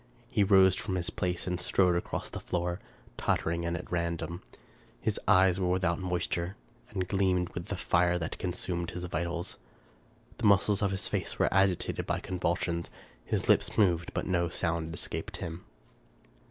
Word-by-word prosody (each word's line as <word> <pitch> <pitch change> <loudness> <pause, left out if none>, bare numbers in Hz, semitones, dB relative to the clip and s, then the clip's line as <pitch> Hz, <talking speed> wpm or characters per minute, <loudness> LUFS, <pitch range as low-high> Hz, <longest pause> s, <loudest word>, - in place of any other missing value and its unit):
He 110 -5 +3
rose 95 -2 +6
from 95 0 -2
his 90 -2 -1
place 90 -1 -1
and 90 -1 -1
strode 90 -1 +3
across 85 - -2
the - - -6
floor, 90 +1 -2 0.4
tottering 85 +1 0
and 85 +1 -1
at 85 - -9
random. 85 0 -2 0.6
His - - -1
eyes 95 0 +5
were 90 -1 +1
without 90 -1 +1
moisture, 90 0 -2 0.3
and 95 -3 -2
gleamed 95 -2 +1
with 85 - -6
the 100 - -2
fire 85 0 +2
that 80 -2 -4
consumed 85 -1 -2
his 90 0 -6
vitals. 85 0 -3 0.8
The 115 - +3
muscles 100 0 +4
of 100 - +2
his 95 0 -1
face - - -2
were - - +2
agitated 95 -2 +2
by - - 0
convul 90 -1 -1
sions. 85 -1 -2 0.3
His - - -2
lips - - +3
moved, 85 -5 +3
but - - -1
no 85 -2 +1
sound 80 -1 -1
escaped - - -3
him. 85 +2 -6
90 Hz, 165 wpm, -30 LUFS, 85-95 Hz, 0.8 s, rose